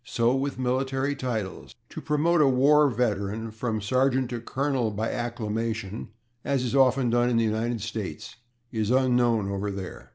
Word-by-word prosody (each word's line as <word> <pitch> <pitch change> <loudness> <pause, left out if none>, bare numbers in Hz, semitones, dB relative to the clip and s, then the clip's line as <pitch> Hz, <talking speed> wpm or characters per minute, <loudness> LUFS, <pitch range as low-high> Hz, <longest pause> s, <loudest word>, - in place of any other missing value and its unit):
So 115 +1 +1
with 135 0 -2
military 130 +2 0
titles. 110 -8 -4
To - - -7
promote 155 +3 +2
a 145 - +5
war 140 +3 +5
veteran 110 -2 -1
from 110 -1 -3
sergeant 130 +3 +1
to 120 -1 -4
colonel 130 -1 -1
by 110 +2 -2
acclamation, 115 -2 -3 0.4
as 140 -2 0
is 125 +1 -2
often 130 -2 +4
done 120 +1 +3
in 120 - +1
the 115 - +3
United 110 +1 -1
States, 110 -1 -6 0.3
is 110 -2 -1
unknown 120 -4 +2
over 100 +1 -2
there. 95 -2 -7
120 Hz, 160 wpm, -26 LUFS, 110-130 Hz, 0.4 s, a